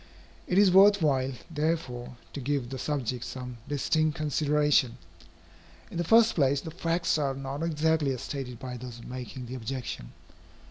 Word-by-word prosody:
It 180 - +1
is 200 -2 +6
worth 200 +2 +7
while, 135 -3 +2 0.2
therefore, 150 -6 -2 0.2
to - - -5
give 135 -2 -1
the 130 - -4
subject 130 -5 -2
some 125 -2 -7
distinct 155 +2 +1
consideration. 150 -4 +2 0.9
In - - -5
the - - +2
first 225 +5 +5
place, 140 -3 +2
the 160 - -7
facts 170 -1 0
are 140 -2 0
not 135 +2 -5
exactly 160 -2 +1
as 130 -2 -3
stated 130 -4 -5
by 125 -1 -6
those 120 -1 -9
making 125 0 -7
the 120 - -7
objection. 125 - -5
140 Hz, 155 wpm, -28 LUFS, 125-160 Hz, 0.9 s, worth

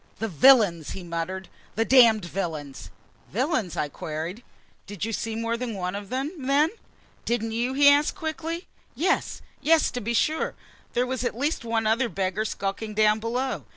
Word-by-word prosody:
"The 225 - -2
villains!" 200 - +5
he 190 - -7
muttered. 175 +2 -4 0.3
"The 225 - +1
damned 230 -7 +6
villains!" 150 - -5 0.4
"Villains?" 240 - -1
I 150 - 0
queried. 160 - -5 0.5
"Did 205 0 -4
you 225 - -4
see 225 +1 -3
more 230 +1 -1
than 235 -3 -4
one 180 -1 -3
of 200 -1 -6
them, 265 +4 -2 0.2
then?" 290 +3 +3 0.5
"Didn't 225 -1 -1
you?" 240 +3 -1
he 285 +1 +6
asked 290 +4 +5
quickly. 330 0 -4 0.3
"Yes, 370 +4 0 0.2
yes, 325 +1 +4
to 250 - -4
be 235 +3 -2
sure! 310 +7 +1 0.4
There 245 +1 +2
was 255 -1 -3
at 245 - -2
least 290 +1 -1
one 225 -1 -1
other 230 +3 +2
beggar 195 +2 -1
skulking 210 +1 -4
down 215 0 +4
below." 245 +4 -2
225 Hz, 170 wpm, -25 LUFS, 195-260 Hz, 0.5 s, damned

